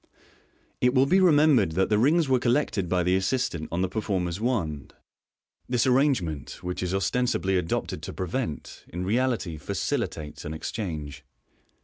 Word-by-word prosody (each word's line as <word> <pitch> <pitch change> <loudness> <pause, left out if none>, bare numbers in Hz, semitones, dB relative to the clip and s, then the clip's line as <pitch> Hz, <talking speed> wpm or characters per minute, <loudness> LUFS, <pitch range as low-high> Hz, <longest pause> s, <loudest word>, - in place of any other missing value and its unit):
It 125 +1 +3
will 130 +1 +5
be 185 +7 +4
remembered 150 - +4
that 95 +3 +1
the 105 -1 +3
rings 155 +6 +3
were 130 -1 +3
collected 120 - 0
by 90 0 +2
the 90 +2 +2
assistant 95 -5 -1
on 85 +3 0
the - - +1
performer's 95 -3 -2
wand. 85 - -2 0.7
This 125 -2 +2
arrangement, 125 - 0
which 90 0 -3
is 90 -1 -2
ostensibly 95 0 0
adopted 90 -3 -2
to - - -6
prevent, 95 - -4
in 90 +2 -4
reality 110 -7 0
facili - - -1
tates 75 -1 -9
an 75 +1 -5
exchange. 75 -6 -5
95 Hz, 150 wpm, -26 LUFS, 85-125 Hz, 0.7 s, will